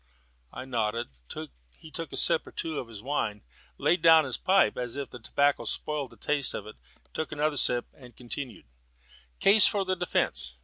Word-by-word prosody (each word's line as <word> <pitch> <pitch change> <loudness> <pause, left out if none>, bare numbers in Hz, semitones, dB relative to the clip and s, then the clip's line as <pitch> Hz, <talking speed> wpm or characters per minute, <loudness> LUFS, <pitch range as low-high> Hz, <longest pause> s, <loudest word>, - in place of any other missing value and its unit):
I 130 - -7
nodded; 115 -2 -1 0.7
he 160 - -13
took 165 +1 -5
a - - -5
sip - - +2
or - - -10
two 160 -3 -3
at 120 - -11
his 110 -2 -11
wine, 115 -7 -2 0.3
laid 175 - +2
down 160 -2 +7
his 130 - -2
pipe 190 +1 +3
as 125 -2 -4
if 140 -1 -5
the 125 - -9
tobacco 140 +5 +1
spoiled 150 -3 -3
the - - -17
taste 145 -2 0
of 105 - -5
it, 105 - -11 0.4
took 160 - -3
another 150 0 0
sip, 120 -2 +3
and 125 -3 -15
continued: 125 -1 -7 0.7
"Case 200 +1 +7
for 200 -2 +1
the 185 0 0
defence. 70 - -1
140 Hz, 185 wpm, -28 LUFS, 120-160 Hz, 0.7 s, down